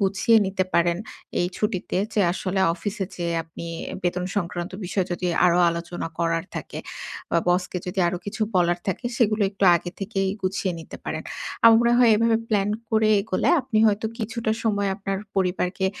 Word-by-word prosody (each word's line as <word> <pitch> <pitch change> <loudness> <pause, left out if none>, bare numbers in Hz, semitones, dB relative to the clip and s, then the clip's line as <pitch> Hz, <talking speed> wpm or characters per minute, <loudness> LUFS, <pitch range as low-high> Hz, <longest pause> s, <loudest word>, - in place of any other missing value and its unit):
গুছিয়ে 195 +3 +3
নিতে 190 -1 0
পারেন 170 0 +3 0.4
এই 175 - +2
ছুটিতে, 210 -4 -2 0.2
যে 210 - +2
আসলে 190 +1 -2 0.2
অফিসে 200 +4 -3
যেয়ে 170 -1 -2
আপনি 165 +1 -9 0.4
বেতন 180 0 -1
সংক্রান্ত 175 -1 -2
বিষয়ে 185 +1 -1
যদি 180 +1 -2 0.2
আরো 175 0 +3
আলোচনা 170 0 -4
করার 165 0 0
থাকে। - - -6 0.5
বা 170 - +3
বসকে 180 +1 +1
যদি 185 +2 -4
আরো 180 - -2
কিছু 205 +2 -3
বলার 175 -1 +3
থাকে 190 +6 -3
সেগুলো 215 -3 +2
একটু 200 0 -1
আগে 175 +1 -6
থেকেই 195 -1 -1
গুছিয়ে 190 0 -1
নিতে 160 - -10
পারেন। - - -3 0.4
আমার 225 -1 +9
মনে 235 - +3
হয় 240 -2 +6
এভাবে 230 +1 +3
প্লান 205 -2 +1 0.2
করে 220 -1 +3
এগোলে 195 -2 0
আপনি 255 -4 -1
হয়তো 210 +1 +1
কিছুটা 225 0 -2
সময় 205 -2 +1
আপনার 195 -1 -3 0.2
পরিবারকে 185 0 0
190 Hz, 170 wpm, -24 LUFS, 175-215 Hz, 0.5 s, আমার